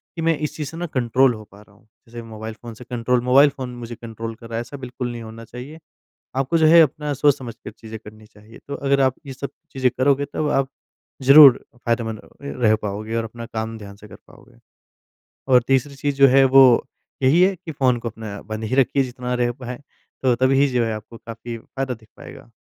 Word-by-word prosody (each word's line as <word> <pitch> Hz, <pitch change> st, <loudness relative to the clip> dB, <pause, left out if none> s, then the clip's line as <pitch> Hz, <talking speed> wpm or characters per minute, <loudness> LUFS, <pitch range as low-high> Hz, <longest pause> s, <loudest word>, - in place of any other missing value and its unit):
कि 165 Hz, -, -4 dB
मैं 165 Hz, -1 st, +2 dB
इस 150 Hz, -1 st, -4 dB
चीज़ 150 Hz, -3 st, -5 dB
से 165 Hz, -, -10 dB
न 175 Hz, -, -3 dB
कंट्रोल 130 Hz, +1 st, +3 dB
हो 110 Hz, -1 st, -9 dB
पा 100 Hz, +1 st, -15 dB
रहा 105 Hz, -1 st, -21 dB
हूँ। 105 Hz, -, -27 dB, 0.2 s
जैसे 120 Hz, +1 st, -8 dB
मोबाइल 110 Hz, -1 st, -8 dB
फ़ोन 120 Hz, -1 st, -8 dB
से 115 Hz, -, -12 dB
कंट्रोल 125 Hz, 0 st, -1 dB
मोबाइल 135 Hz, +4 st, +6 dB
फ़ोन 125 Hz, -3 st, -7 dB
मुझे 120 Hz, -1 st, -8 dB
कंट्रोल 115 Hz, 0 st, -7 dB
कर 115 Hz, 0 st, -13 dB
रहा 115 Hz, -, -5 dB
है। -, -, -1 dB
ऐसा 120 Hz, +4 st, -9 dB
बिल्कुल 125 Hz, -1 st, -5 dB
नहीं 120 Hz, -1 st, -7 dB
होना 115 Hz, +1 st, -10 dB
चाहिए। 125 Hz, +7 st, -10 dB, 0.6 s
आपको 135 Hz, +5 st, +1 dB
जो 160 Hz, -, +4 dB
है 165 Hz, +2 st, +8 dB
अपना 150 Hz, 0 st, -1 dB
सोच 145 Hz, 0 st, +3 dB
समझकर 120 Hz, -3 st, -9 dB
चीज़ें 110 Hz, 0 st, -10 dB
करनी 110 Hz, 0 st, -13 dB
चाहिए। 105 Hz, +2 st, -17 dB
तो 140 Hz, -, -4 dB
अगर 140 Hz, 0 st, +1 dB
आप 130 Hz, -1 st, +3 dB
ये 135 Hz, -, -6 dB
सब 140 Hz, +1 st, -6 dB, 0.2 s
चीज़ें 130 Hz, -1 st, +1 dB
करोगे 140 Hz, +2 st, +2 dB
तब 155 Hz, -, -1 dB
आप 135 Hz, -2 st, 0 dB, 0.5 s
ज़रूर 140 Hz, 0 st, +8 dB, 0.2 s
फायदेमंद 115 Hz, -2 st, -1 dB, 0.2 s
र 140 Hz, -, -5 dB
रह 110 Hz, -1 st, +5 dB
पाओगे 105 Hz, +2 st, -4 dB
और 115 Hz, -, -1 dB
अपना 115 Hz, +1 st, -8 dB
काम 110 Hz, 0 st, -5 dB
ध्यान 100 Hz, -2 st, -11 dB
से 105 Hz, +1 st, -15 dB
कर -, -, -12 dB
पाओगे। 125 Hz, -2 st, -19 dB, 0.9 s
और 125 Hz, -1 st, +7 dB
तीसरी 135 Hz, +1 st, +1 dB
चीज़ 145 Hz, 0 st, -2 dB
जो 140 Hz, 0 st, +7 dB
है 135 Hz, +1 st, +5 dB
वो 135 Hz, 0 st, +7 dB, 0.6 s
यही 145 Hz, +7 st, +5 dB
है 190 Hz, +1 st, +4 dB
कि 170 Hz, -2 st, -9 dB
फ़ोन 130 Hz, -4 st, +1 dB
को 115 Hz, -, -4 dB
अपना 105 Hz, -2 st, -8 dB
बंद 110 Hz, +1 st, -6 dB
ही 110 Hz, +4 st, -2 dB
रखिए 135 Hz, +1 st, +3 dB
जितना 125 Hz, -1 st, -4 dB
रह 120 Hz, -1 st, 0 dB
पाए। 125 Hz, 0 st, -6 dB, 0.4 s
तो 130 Hz, -2 st, +3 dB
तब 130 Hz, +2 st, +2 dB
ही 135 Hz, +1 st, +4 dB
जो 120 Hz, -1 st, +2 dB
है 115 Hz, -, -2 dB
आपको 110 Hz, +2 st, -10 dB
काफ़ी 115 Hz, +1 st, -8 dB
फ़ायदा 135 Hz, +3 st, -5 dB
दिख 110 Hz, -2 st, -20 dB
पाएगा। -, -, -13 dB
125 Hz, 230 wpm, -21 LUFS, 115-135 Hz, 0.9 s, है